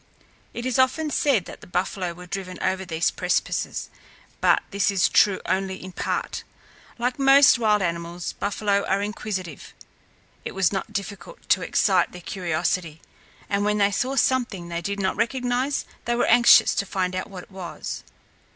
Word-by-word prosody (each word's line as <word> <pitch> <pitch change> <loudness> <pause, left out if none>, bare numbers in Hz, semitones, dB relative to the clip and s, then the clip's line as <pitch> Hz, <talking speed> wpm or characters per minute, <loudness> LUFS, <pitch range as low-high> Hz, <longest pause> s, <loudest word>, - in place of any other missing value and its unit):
It 240 - -6
is 255 -1 0
often 290 +4 +2
said 260 - +2
that - - -11
the - - -13
buffalo 180 0 -2
were 180 +1 -11
driven 185 0 -5
over 190 0 -1
these 165 -1 0
precipices, - - -2 0.5
but - - +3
this 200 -1 +1
is 195 -2 +3
true 200 -3 +4
only 190 0 -1
in 185 0 -9
part. - - -3 0.5
Like 245 +2 -2
most 275 -1 +6
wild 210 -3 +3
animals, 170 0 -3
buffalo 200 0 0
are 195 +1 +1
inquisitive. 195 -6 -5 0.7
It - - -6
was 195 0 +2
not 195 +2 -3
difficult 205 - -7
to - - +4
excite 185 -4 +2
their 180 - -9
curiosity, 170 -2 -2 0.5
and 200 0 0
when 210 0 +1
they 200 0 +3
saw 255 +7 -1
something 235 -9 0
they 170 0 -3
did 200 +2 -3
not 190 -1 -1
recognize, 250 +3 0 0.2
they 240 - 0
were 240 - +2
anxious 240 -1 +6
to 200 - -1
find 185 -1 -1
out 185 - -4
what 185 -3 -8
it - - -20
was. 185 -3 -6
200 Hz, 170 wpm, -24 LUFS, 180-235 Hz, 0.7 s, most